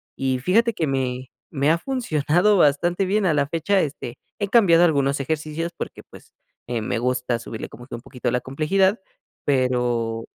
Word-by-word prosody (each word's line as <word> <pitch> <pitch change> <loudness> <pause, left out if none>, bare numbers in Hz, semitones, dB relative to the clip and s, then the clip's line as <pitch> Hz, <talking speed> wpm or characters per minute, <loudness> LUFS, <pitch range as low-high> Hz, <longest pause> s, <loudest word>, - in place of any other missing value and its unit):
y 130 -1 -1
fíjate 225 - +2
que 165 -7 -1
me 130 -1 -2 0.2
me 140 0 +1
ha 165 - +3
funcionado 180 - +1
bastante 175 +4 +2
bien 200 +2 +1
a 165 - +3
la 145 -2 +1
fecha, 170 +6 +1
este, 135 -5 -5 0.2
he 205 - -1
cambiado 190 -6 +5
algunos 140 -3 +1
ejercicios 155 +4 -3
porque, - - -6
pues, - - -16 0.3
eh 120 -2 -2
me 110 - -2
gusta 125 -1 -1
subirle 115 -2 -7
como 120 +2 -13
que - - -6
un 120 - -9
poquito 125 -1 -4
la 125 - 0
complejidad, 190 +9 +1 0.5
pero. 120 -4 0
145 Hz, 175 wpm, -23 LUFS, 125-175 Hz, 0.5 s, cambiado